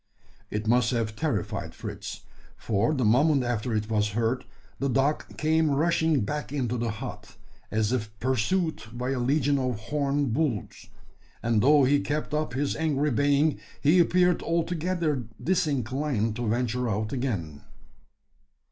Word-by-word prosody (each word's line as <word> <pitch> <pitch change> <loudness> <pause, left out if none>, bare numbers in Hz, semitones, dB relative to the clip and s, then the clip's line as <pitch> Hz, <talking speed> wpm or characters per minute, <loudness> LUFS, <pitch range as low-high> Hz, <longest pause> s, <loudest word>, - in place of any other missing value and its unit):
It 105 +1 -3
must 120 +1 +3
have 115 -3 -1
terrified 110 - -2
Fritz: - - -7 0.4
for 110 +6 0
the 130 -4 +1
moment 140 +5 +4
after 120 -1 -2
it 105 0 -1
was 105 -2 0
heard, 115 +2 0 0.3
the 140 - 0
dog 135 +4 0
came 160 +1 +2
rushing 160 0 +2
back 145 +8 -3
into 125 -5 -1
the 120 -1 -1
hut, 105 - -7 0.3
as 110 0 0
if 110 -5 -1
pursued 145 - 0
by 125 +2 -3
a 135 - -1
legion 140 +2 +2
of 125 -3 -1
horned 140 +1 -1
bulls; 135 -6 -2 0.6
and, 115 -2 +2
though 145 +3 +6
he 140 +2 +4
kept 150 +1 -3
up 150 -4 -1
his 140 +1 0
angry 150 -2 +1
baying, 145 +3 +2 0.2
he 155 +5 +4
appeared 180 0 +3
altogether 165 -4 -1
disinclined 135 - 0
to 120 -1 -2
venture 120 +2 0
out 110 +3 -2
again. 95 - -3
130 Hz, 145 wpm, -27 LUFS, 115-150 Hz, 0.6 s, though